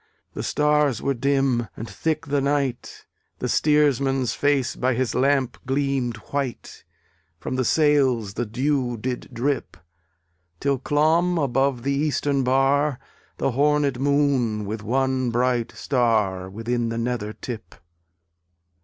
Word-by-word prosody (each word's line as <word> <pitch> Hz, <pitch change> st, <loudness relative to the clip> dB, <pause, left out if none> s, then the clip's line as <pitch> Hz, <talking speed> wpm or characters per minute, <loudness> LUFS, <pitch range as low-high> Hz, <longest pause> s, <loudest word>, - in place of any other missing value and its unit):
The -, -, -4 dB
stars 150 Hz, -4 st, +2 dB
were 140 Hz, -, 0 dB
dim, 135 Hz, -2 st, +1 dB
and 115 Hz, -, -6 dB
thick 160 Hz, +4 st, -2 dB
the 145 Hz, -1 st, 0 dB
night, 140 Hz, -3 st, -2 dB, 0.3 s
The -, -, -3 dB
steersman's 140 Hz, -4 st, +2 dB
face 140 Hz, -3 st, +1 dB
by 130 Hz, 0 st, 0 dB
his 130 Hz, 0 st, -1 dB
lamp 135 Hz, -1 st, +1 dB
gleamed 135 Hz, -3 st, 0 dB, 0.2 s
white; 140 Hz, -4 st, -4 dB, 0.6 s
From 130 Hz, -, -4 dB
the 130 Hz, -, +1 dB
sails 130 Hz, -7 st, +2 dB
the 120 Hz, +2 st, -3 dB
dew 125 Hz, +1 st, -1 dB
did 125 Hz, +3 st, -4 dB
drip 130 Hz, -, -2 dB, 0.8 s
Till 140 Hz, -2 st, 0 dB
clomb 160 Hz, +6 st, +2 dB
above 135 Hz, -3 st, +1 dB
the 140 Hz, +1 st, 0 dB
eastern 140 Hz, -1 st, 0 dB
bar 135 Hz, +2 st, +2 dB, 0.4 s
The -, -, 0 dB
hornéd 145 Hz, 0 st, +2 dB
Moon, 135 Hz, -6 st, +1 dB
with 105 Hz, +1 st, -4 dB
one 130 Hz, +3 st, 0 dB
bright 120 Hz, 0 st, 0 dB
star 110 Hz, -8 st, 0 dB
Within 115 Hz, +3 st, -2 dB
the 115 Hz, -, -3 dB
nether 115 Hz, -3 st, -2 dB
tip. 110 Hz, -8 st, -8 dB
130 Hz, 125 wpm, -23 LUFS, 120-140 Hz, 0.8 s, stars